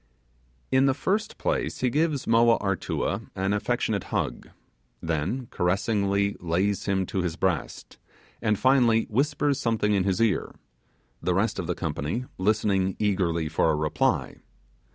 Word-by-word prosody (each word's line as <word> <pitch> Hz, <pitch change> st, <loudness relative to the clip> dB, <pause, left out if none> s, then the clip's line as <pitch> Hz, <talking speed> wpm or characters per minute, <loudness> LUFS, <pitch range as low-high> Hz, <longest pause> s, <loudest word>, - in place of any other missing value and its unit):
In 130 Hz, +1 st, +4 dB
the 135 Hz, -, +2 dB
first 205 Hz, +9 st, -1 dB
place -, -, -2 dB
he 125 Hz, -1 st, +1 dB
gives 150 Hz, -1 st, 0 dB
Moa 115 Hz, 0 st, +4 dB
Artua 95 Hz, -4 st, -2 dB
an 95 Hz, +1 st, 0 dB
affectionate 105 Hz, -2 st, -1 dB
hug, -, -, -3 dB, 0.5 s
then 85 Hz, -, -2 dB
caressingly 100 Hz, +2 st, +1 dB
lays 90 Hz, +4 st, 0 dB
him 95 Hz, -1 st, +1 dB
to 95 Hz, -, -2 dB
his 85 Hz, -2 st, -2 dB
breast, 90 Hz, -4 st, -3 dB, 0.4 s
and, 105 Hz, -2 st, +1 dB
finally, 120 Hz, -3 st, +4 dB
whispers 140 Hz, +3 st, +1 dB
something 110 Hz, -5 st, +1 dB
in 95 Hz, -2 st, +2 dB
his 95 Hz, -1 st, 0 dB
ear; 115 Hz, -4 st, +1 dB, 0.7 s
the -, -, 0 dB
rest -, -, 0 dB
of -, -, -3 dB
the -, -, -1 dB
company 85 Hz, -, -3 dB
listening 95 Hz, -1 st, +1 dB
eagerly 90 Hz, -6 st, 0 dB
for 80 Hz, -, +1 dB
a 80 Hz, -, +2 dB
reply. 75 Hz, 0 st, 0 dB
100 Hz, 140 wpm, -26 LUFS, 95-120 Hz, 0.7 s, In